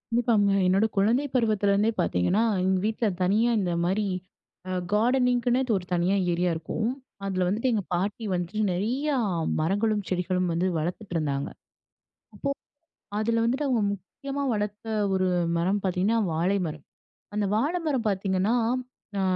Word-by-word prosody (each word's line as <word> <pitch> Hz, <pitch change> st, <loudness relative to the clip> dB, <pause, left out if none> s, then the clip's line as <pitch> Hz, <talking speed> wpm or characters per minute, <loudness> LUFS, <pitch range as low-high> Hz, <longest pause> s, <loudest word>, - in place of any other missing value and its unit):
இப்பாங்க 225 Hz, -4 st, +3 dB, 0.2 s
என்னோட 190 Hz, +4 st, +3 dB
குழந்தை 225 Hz, +8 st, +3 dB
பருவத்திலேருந்தே 210 Hz, -3 st, +2 dB
பார்த்தீங்கன்னா, 180 Hz, -, +2 dB, 0.2 s
எங்க 190 Hz, 0 st, +2 dB
வீட்ல 220 Hz, +2 st, 0 dB, 0.2 s
தனியா 210 Hz, +6 st, +3 dB
இந்த 180 Hz, -3 st, 0 dB
மாரி 195 Hz, +4 st, +1 dB, 0.6 s
அ -, -, -2 dB, 0.2 s
கார்டனிங்கின்னே 245 Hz, +2 st, +2 dB, 0.2 s
ஒரு 180 Hz, -, -6 dB
தனியா 175 Hz, +3 st, +2 dB, 0.2 s
ஏரியா 175 Hz, +1 st, +1 dB
இருக்கும். 165 Hz, +7 st, -2 dB, 0.4 s
அதில 185 Hz, -2 st, 0 dB
வந்துட்டு 225 Hz, +7 st, +1 dB
எங்க 210 Hz, -3 st, 0 dB
பாட்டி 200 Hz, +6 st, -1 dB
வந்துட்டு, 180 Hz, +4 st, -2 dB
நிறையா 255 Hz, +11 st, 0 dB, 0.4 s
மரங்களும், 205 Hz, +5 st, +1 dB
செடிகளும் 180 Hz, 0 st, 0 dB
வந்து 175 Hz, +3 st, +1 dB
வளர்த்துட்டு 175 Hz, +5 st, -4 dB
இருந்தாங்க. 140 Hz, -3 st, -1 dB, 0.9 s
அப்போ, -, -, -2 dB, 0.7 s
அதில 230 Hz, +1 st, +1 dB
வந்துட்டு 260 Hz, +5 st, 0 dB
அவங்க 245 Hz, -4 st, +2 dB
முக்கியமா 275 Hz, -, -6 dB
வளர்த்த 210 Hz, +1 st, -3 dB, 0.3 s
ஒரு 185 Hz, 0 st, +1 dB, 0.3 s
மரம் 190 Hz, +4 st, +1 dB
பார்த்தீங்கன்னா, 190 Hz, +4 st, +1 dB
வாழை 180 Hz, +5 st, +1 dB
மரம். 150 Hz, -2 st, -8 dB, 0.5 s
அந்த 210 Hz, -1 st, +1 dB
வாழ 280 Hz, +10 st, +1 dB
மரம் 265 Hz, -6 st, 0 dB
பார்த்தீங்கன்னா, 195 Hz, +2 st, +1 dB, 0.6 s
ஆ -, -, +1 dB
205 Hz, 135 wpm, -26 LUFS, 180-230 Hz, 0.9 s, இப்பாங்க